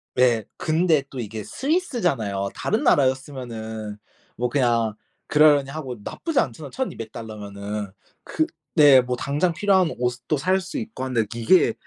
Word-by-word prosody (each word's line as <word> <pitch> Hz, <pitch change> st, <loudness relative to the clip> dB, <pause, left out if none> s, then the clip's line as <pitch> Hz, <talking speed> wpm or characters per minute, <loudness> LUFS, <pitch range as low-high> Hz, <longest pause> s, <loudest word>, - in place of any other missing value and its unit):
네. 120 Hz, -3 st, +3 dB
근데 160 Hz, -2 st, +2 dB
또 135 Hz, -, -7 dB
이게 110 Hz, -2 st, -5 dB
스위스잖아요. 175 Hz, -, -1 dB
다른 -, -, -1 dB
나라였으면은 120 Hz, -6 st, 0 dB, 0.4 s
뭐 125 Hz, 0 st, -1 dB
그냥 120 Hz, -5 st, +2 dB, 0.3 s
그러려니 150 Hz, -2 st, +5 dB
하고 135 Hz, -4 st, -5 dB
나쁘지 325 Hz, -5 st, -1 dB
않잖아요, 140 Hz, +3 st, -2 dB
1,200 115 Hz, -, -4 dB
달러면은. 105 Hz, -2 st, -6 dB, 0.3 s
그 155 Hz, -, 0 dB, 0.3 s
네 140 Hz, -3 st, +7 dB
뭐 125 Hz, 0 st, -2 dB
당장 145 Hz, +8 st, 0 dB
필요한 190 Hz, -2 st, +3 dB
옷도 125 Hz, +5 st, -1 dB
살 185 Hz, +7 st, +1 dB
수 190 Hz, +10 st, -6 dB
있고 225 Hz, -, -6 dB
한데 125 Hz, -4 st, 0 dB
이게 120 Hz, +11 st, +4 dB
130 Hz, 295 characters per minute, -23 LUFS, 115-155 Hz, 0.4 s, 네